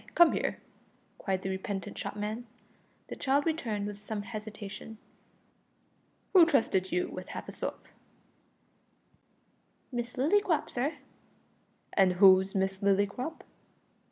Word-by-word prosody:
come 345 -1 +7
here," - - -1 0.6
cried 190 -2 -2
the 190 - -2
repentant 190 0 -4
shopman. 215 +3 -4 0.6
The - - -5
child 280 +1 +1
returned 230 -11 -1
with 205 0 -6
some 210 0 -4
hesitation. 215 0 -7 1.4
"Who 370 -3 +9
trusted 195 - +2
you 180 0 +1
with 185 - -7
half - - -6
a - - -6
sov?" - - -4 2.1
"Miss 240 -1 -3
Lillycrop, 320 +4 +2
sir." 270 +6 -1 1.0
"And 190 -2 +4
who's 190 +1 +6
Miss 190 0 0
Lillycrop?" 200 +9 0
210 Hz, 110 wpm, -30 LUFS, 195-255 Hz, 2.1 s, Who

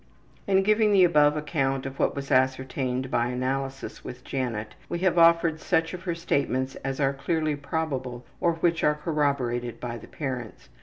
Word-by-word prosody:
In 195 -1 +4
giving 215 +1 +3
the 190 -2 +6
above 150 -3 +4
account 135 -3 -1
of 135 0 -7
what - - +1
was 140 0 -5
ascertained 130 0 0
by 120 - +2
analysis 135 +2 -3
with 125 0 -8
Janet 115 -5 -3 0.2
we - - -2
have 175 -2 +3
offered 165 -1 +5
such 165 +1 0
of 180 - -6
her 170 -2 -1
statements 135 -5 -1
as 135 +1 -4
are 140 -1 +2
clearly 155 +2 -1
probable 135 -5 -3
or 170 - +2
which 165 0 0
are 150 - +4
corroborated 140 -6 -1
by 120 -1 -5
the - - -13
parents. 130 -6 -6
140 Hz, 170 wpm, -26 LUFS, 130-165 Hz, 0.2 s, the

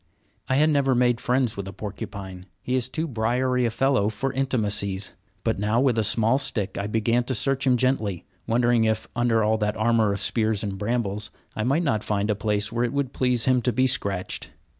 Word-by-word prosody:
I 130 - +2
had 155 +3 +4
never 135 -3 +2
made 120 -1 +2
friends 125 -2 +1
with 100 -1 -5
a 95 - -7
porcupine, 95 -2 -7 0.2
he 125 - -2
is 130 -1 0
too 160 +4 -2
briery 125 +1 0
a - - 0
fellow 125 -3 +1
for 130 +5 -3
intimacies, 105 -7 -1 0.3
but 115 -3 0
now 105 +3 +1
with 130 -2 +3
a - - +2
small 115 +5 +2
stick 100 -8 -1
I 100 - -3
began 115 +3 +1
to 130 - -1
search 135 +3 +2
him 125 -1 +4
gently, 110 -8 0 0.2
wondering 120 0 +3
if, 110 0 0
under 120 -2 +2
all 110 +1 +2
that 105 0 -1
armor 110 -1 +2
of 100 - -2
spears 110 -1 0
and 100 -2 -3
brambles, 105 -2 -2 0.3
I 110 - -2
might 140 +8 +1
not 110 -9 0
find 105 0 0
a - - 0
place 105 0 -1
where 120 +1 0
it 120 - -1
would 140 -2 -1
please 125 -2 +1
him 130 -1 +3
to 125 - +1
be 130 +3 +2
scratched. 100 -8 -1
115 Hz, 210 wpm, -24 LUFS, 105-130 Hz, 0.3 s, had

